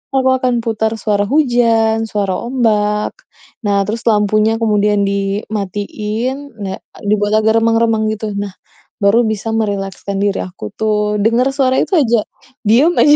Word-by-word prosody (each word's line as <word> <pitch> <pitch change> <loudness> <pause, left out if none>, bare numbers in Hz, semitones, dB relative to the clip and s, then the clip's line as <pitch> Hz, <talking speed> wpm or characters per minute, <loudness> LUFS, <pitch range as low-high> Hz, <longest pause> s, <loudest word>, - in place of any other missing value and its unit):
aku 260 -1 +3
akan 255 -1 0
putar 220 -1 0
suara 205 -2 +1
hujan, 230 -6 +2
suara 200 -3 -1
ombak. 210 -4 +1 0.5
Nah, 200 -1 +2
terus 225 +2 -3
lampunya 215 +1 +2
kemudian 210 -2 +2
dimatiin 210 +6 -3
na 190 -1 -4 0.3
dibuat 205 0 +1
agak 220 +1 +3
remang-remang 225 -1 +2
gitu. 215 -1 -5
Nah, 200 -2 -4 0.5
baru 205 +4 +5
bisa 220 +1 -3
merilekskan 200 -2 -2
diri 200 -1 0
aku 175 - -8
tuh, 210 -1 0
dengar 235 +4 +3
suara 260 -2 +2
itu - - -3
aja, 235 -3 +2 0.5
diam 270 +11 +5
aja, 295 0 +6
215 Hz, 135 wpm, -16 LUFS, 205-230 Hz, 0.5 s, aja